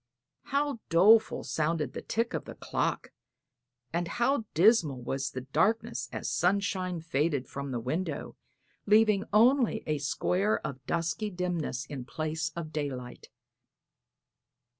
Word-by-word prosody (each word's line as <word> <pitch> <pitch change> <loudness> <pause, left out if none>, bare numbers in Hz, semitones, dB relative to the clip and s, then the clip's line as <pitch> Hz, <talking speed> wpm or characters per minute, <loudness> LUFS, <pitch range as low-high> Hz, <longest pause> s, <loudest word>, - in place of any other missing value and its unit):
How 280 -2 0
doleful 215 +7 +5
sounded 150 -3 -1
the - - -5
tick 230 +1 -1
of - - -3
the - - -9
clock, - - -2 0.8
and 170 +1 0
how 240 +5 +1
dismal 170 - +4
was 135 +3 -2
the 130 - -6
darkness 135 - 0
as - - -4
sunshine 185 -1 0
faded 150 -3 0
from 140 0 -6
the 125 -2 -2
window, 155 +11 -3 0.5
leaving 210 -1 +4
only 235 +1 +4
a 155 -1 -1
square 180 +8 +1
of 130 -2 -6
dusky 170 +5 -1
dimness 175 -7 -2
in 135 -4 -7
place 155 +3 -3
of 160 -2 -6
daylight! 135 -5 -5
165 Hz, 125 wpm, -29 LUFS, 140-210 Hz, 0.8 s, doleful